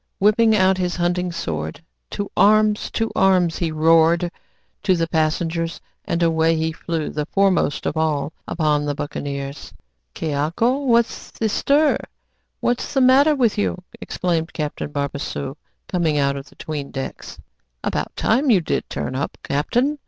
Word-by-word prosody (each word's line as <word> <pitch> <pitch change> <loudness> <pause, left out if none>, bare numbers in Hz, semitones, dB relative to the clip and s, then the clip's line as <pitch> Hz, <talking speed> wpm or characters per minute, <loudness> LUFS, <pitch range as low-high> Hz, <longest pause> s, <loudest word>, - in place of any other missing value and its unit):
Whipping 215 +2 +4
out 190 -1 +3
his 180 -1 -1
hunting 175 0 0
sword, 80 - -4 0.3
"To 205 -1 -4
arms! 215 0 +4
to 225 0 -1
arms!" 185 -3 +3
he 170 -2 -1
roared 165 +2 +4 0.5
to 190 -2 +3
the 165 -1 +1
passengers; 165 +1 -1 0.3
and 170 0 0
away 165 0 +3
he 160 0 0
flew, 160 0 -3
the 150 0 -3
foremost 190 -7 +1
of - - -1
all, 155 -1 0
upon 150 -3 +1
the 145 -1 -1
buccaneers. 140 -1 -5 0.4
"Ques 160 - -3
aco? 170 - +1
What's 235 -2 +1
the 225 - -2
stir? 285 +7 +2 0.6
What's 245 +3 -1
the 270 - +4
matter 275 +4 +5
with 235 -6 +1
you?" 205 - 0 0.2
exclaimed 170 -2 -2
Captain 150 -1 -4
Barbassou, 140 -1 -3 0.3
coming 170 -5 0
out 140 -1 +2
of 140 +1 -7
the - - -21
'tweendecks. 140 -3 -6 0.5
"About - - -2
time 260 +6 +2
you 210 -6 +6
did 165 - -2
turn - - -3
up, 135 +2 -3
captain! 245 - 0
170 Hz, 150 wpm, -21 LUFS, 150-205 Hz, 0.6 s, you